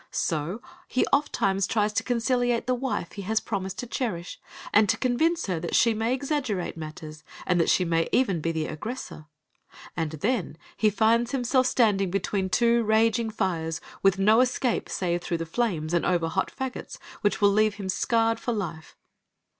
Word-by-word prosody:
So, 170 Hz, -, -2 dB, 0.2 s
he 255 Hz, -, +1 dB
ofttimes 195 Hz, -9 st, +1 dB
tries 210 Hz, -1 st, +1 dB
to -, -, +1 dB
conciliate 245 Hz, 0 st, 0 dB
the 255 Hz, -, +1 dB
wife 250 Hz, -8 st, -3 dB
he 200 Hz, -, -7 dB
has 220 Hz, +3 st, 0 dB
promised 190 Hz, -2 st, -4 dB
to -, -, -4 dB
cherish, 215 Hz, -8 st, -4 dB, 0.3 s
and 210 Hz, 0 st, +5 dB
to 225 Hz, -, +2 dB
convince 320 Hz, +7 st, +1 dB
her 180 Hz, -4 st, -2 dB
that 170 Hz, +1 st, -3 dB
she 230 Hz, -1 st, +4 dB
may 225 Hz, +2 st, -1 dB
exaggerate 260 Hz, -, -2 dB
matters, 155 Hz, -1 st, -8 dB, 0.2 s
and 180 Hz, -1 st, +2 dB
that -, -, +1 dB
she 185 Hz, -, +3 dB
may 165 Hz, -1 st, +1 dB
even 195 Hz, -11 st, +2 dB
be 165 Hz, -, 0 dB
the 160 Hz, -1 st, -2 dB
aggressor, 155 Hz, -1 st, -6 dB, 0.7 s
and 160 Hz, -2 st, -2 dB
then 200 Hz, -, -1 dB, 0.2 s
he 215 Hz, -, +3 dB
finds 230 Hz, +4 st, +2 dB
himself 255 Hz, 0 st, +2 dB
standing 205 Hz, -7 st, +2 dB
between 190 Hz, +1 st, -1 dB
two 235 Hz, +4 st, +3 dB
raging 225 Hz, +1 st, +2 dB
fires, 165 Hz, -6 st, -2 dB, 0.2 s
with 195 Hz, 0 st, +4 dB
no 215 Hz, +5 st, +5 dB
escape 255 Hz, -1 st, 0 dB
save 175 Hz, -2 st, -1 dB
through 170 Hz, -, -2 dB
flames, 165 Hz, -4 st, -1 dB
and 170 Hz, -, +2 dB
over 170 Hz, -3 st, +1 dB
hot -, -, -1 dB
fagots, 265 Hz, -1 st, -6 dB, 0.2 s
which 205 Hz, -, +1 dB
will 205 Hz, -1 st, +5 dB
leave 215 Hz, 0 st, +2 dB
him 200 Hz, -2 st, -6 dB
scarred 225 Hz, +3 st, +1 dB
for 240 Hz, -, -2 dB
life. 170 Hz, -7 st, -5 dB
210 Hz, 175 wpm, -26 LUFS, 175-240 Hz, 0.7 s, and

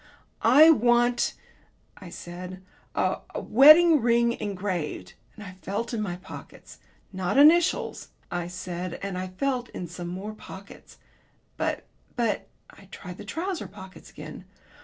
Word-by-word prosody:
"I 310 Hz, +4 st, +8 dB
want," 240 Hz, -2 st, +2 dB, 0.6 s
I 185 Hz, -, -11 dB
said, 180 Hz, +2 st, -9 dB, 0.3 s
"a -, -, 0 dB, 0.2 s
wedding 305 Hz, +4 st, +7 dB
ring 235 Hz, 0 st, +3 dB
engraved," 185 Hz, -, -4 dB, 0.2 s
and 210 Hz, -, -10 dB
I 190 Hz, -2 st, -9 dB
felt 225 Hz, +5 st, -4 dB
in 225 Hz, -, -1 dB
my 185 Hz, -4 st, -3 dB
pockets. 180 Hz, -, -12 dB, 0.3 s
"Not 185 Hz, +4 st, -1 dB
initials," 320 Hz, +4 st, +4 dB, 0.2 s
I 175 Hz, -1 st, -3 dB
said, 180 Hz, -1 st, -5 dB
and 200 Hz, -2 st, -4 dB
I 185 Hz, 0 st, -3 dB
felt 250 Hz, +6 st, -2 dB
in 180 Hz, -, -6 dB
some 175 Hz, +1 st, -7 dB
more 190 Hz, +5 st, -6 dB
pockets, 200 Hz, -2 st, -13 dB, 0.6 s
"but -, -, -2 dB, 0.3 s
but 230 Hz, -5 st, -1 dB
" -, -, -42 dB
I 200 Hz, -, -16 dB
tried 180 Hz, -1 st, -10 dB
the -, -, -8 dB
trousers 335 Hz, -, -4 dB
pockets 190 Hz, 0 st, -13 dB
again. -, -, -10 dB
200 Hz, 140 wpm, -26 LUFS, 180-245 Hz, 0.6 s, I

